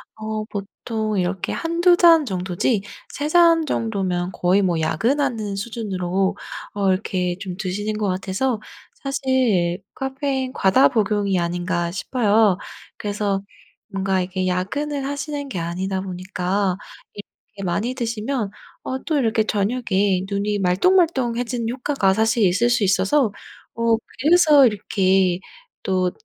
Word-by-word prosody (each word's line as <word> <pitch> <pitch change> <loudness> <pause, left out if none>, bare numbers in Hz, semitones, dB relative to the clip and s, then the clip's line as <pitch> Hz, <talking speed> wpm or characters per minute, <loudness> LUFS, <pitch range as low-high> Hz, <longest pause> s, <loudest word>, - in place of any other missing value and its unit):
어 215 0 -4
보통 215 +1 -4
이렇게 185 0 -1
1-2 345 +2 +3
잔 330 -3 +6
정도지 190 +1 -1 0.3
3 290 - -3
잔 335 -1 +5
정도면 190 -8 -1
거의 180 +3 +2
뭐 175 -4 +1
야근하는 225 - 0
수준으로 195 -3 -2 0.4
어 200 -2 +1
이렇게 185 -2 -1
좀 185 -2 -5
드시는 205 +3 -3
것 210 -1 -1
같아서 195 +6 -1 0.3
사실 255 -10 0
카페인 265 -1 -2
과다 195 +3 +4
복용이 205 -4 +1
아닌가 175 0 -1
싶어요. 210 -1 +2 0.4
그래서 205 -1 -1 0.5
뭔가 195 -1 0
이게 185 +1 -2
야근을 275 +11 -2
하시는 285 0 -4
게 185 - -4
아니다 185 +3 -2
보니까 185 0 -2 0.4
이렇게 205 0 -12
많이 205 +8 -1
드시면 230 -2 -2 0.3
어 260 - -3
또 315 - +1
이렇게 225 -4 +2
저녁에 205 -3 0
눈이 205 +1 -1
말똥말똥 255 - +2
해지는 240 -1 -2
효과가 250 -5 +1
사실 220 +2 +2
있을 200 +7 +2
수 240 -2 +2
있어서 200 +6 +2 0.5
어 230 -1 +3 0.2
그래서 300 -1 +6
이렇게 190 -3 +1 0.4
또 185 -1 +1
205 Hz, 270 characters per minute, -22 LUFS, 190-255 Hz, 0.5 s, 잔